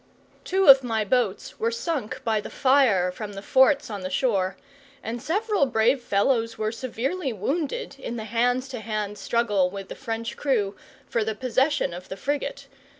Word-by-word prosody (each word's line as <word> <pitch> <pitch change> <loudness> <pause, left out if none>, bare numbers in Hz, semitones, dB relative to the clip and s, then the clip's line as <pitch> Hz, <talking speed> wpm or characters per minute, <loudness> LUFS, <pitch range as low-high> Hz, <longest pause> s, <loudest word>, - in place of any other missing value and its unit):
Two 380 +1 +1
of 270 -1 +9
my 225 -3 -1
boats 215 -3 -1
were 225 - +1
sunk 235 +1 -3
by 220 -2 +1
the - - -8
fire 250 -10 +3
from 205 +2 -7
the 195 - -7
forts 270 +4 +4
on 205 -2 -5
the 185 - -4
shore, 190 -3 0 0.5
and 230 +1 -4
several 400 - +1
brave 245 +2 +2
fellows 230 +2 +1
were 215 0 -1
severely 260 +6 -3
wounded 275 - -3
in 240 -3 -5
the 225 - -4
hand 245 +3 +1
to 260 -2 -7
hand 215 -2 -4
struggle 210 -6 +1
with 195 0 -8
the - - -6
French 230 -2 -4
crew 215 -8 0 0.3
for 230 - 0
the 220 0 -2
possession 260 - +1
of 180 +1 -9
the 190 - -6
frigate. 280 +3 -3
230 Hz, 175 wpm, -25 LUFS, 210-270 Hz, 0.5 s, of